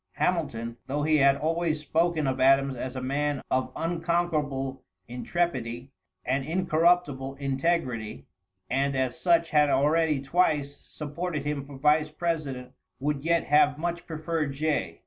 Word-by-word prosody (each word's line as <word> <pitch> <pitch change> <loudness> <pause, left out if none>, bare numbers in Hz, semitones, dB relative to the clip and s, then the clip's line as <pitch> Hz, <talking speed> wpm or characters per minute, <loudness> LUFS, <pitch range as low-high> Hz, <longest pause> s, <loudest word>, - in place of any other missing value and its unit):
Hamilton, 120 -10 -1
though 145 +2 -1
he 155 0 +3
had 140 -1 +5
always 160 +1 0
spoken 160 +1 0
of 130 -1 -1
Adams 135 +1 +4
as 130 +1 -5
a 130 - -3
man 145 +1 -1
of 130 0 0
unconquerable 165 -5 -1 0.2
intrepidity 125 -2 -2 0.3
and 135 +1 0
incorruptible 160 -4 +1
integrity, 135 -5 -1 0.4
and 135 +2 0
as 130 -2 -1
such 170 -2 +3
had 150 -1 +4
already 150 +2 +2
twice 145 -1 +1
supported 150 +1 -5
him 145 -2 -2
for 140 0 -11
vice 150 +2 +3
president, 150 -6 -3 0.3
would 140 0 -2
yet 170 +1 +2
have 145 0 +4
much 170 +1 -3
preferred 155 -2 -2
Jay. 155 +2 -1
145 Hz, 135 wpm, -27 LUFS, 135-165 Hz, 0.4 s, had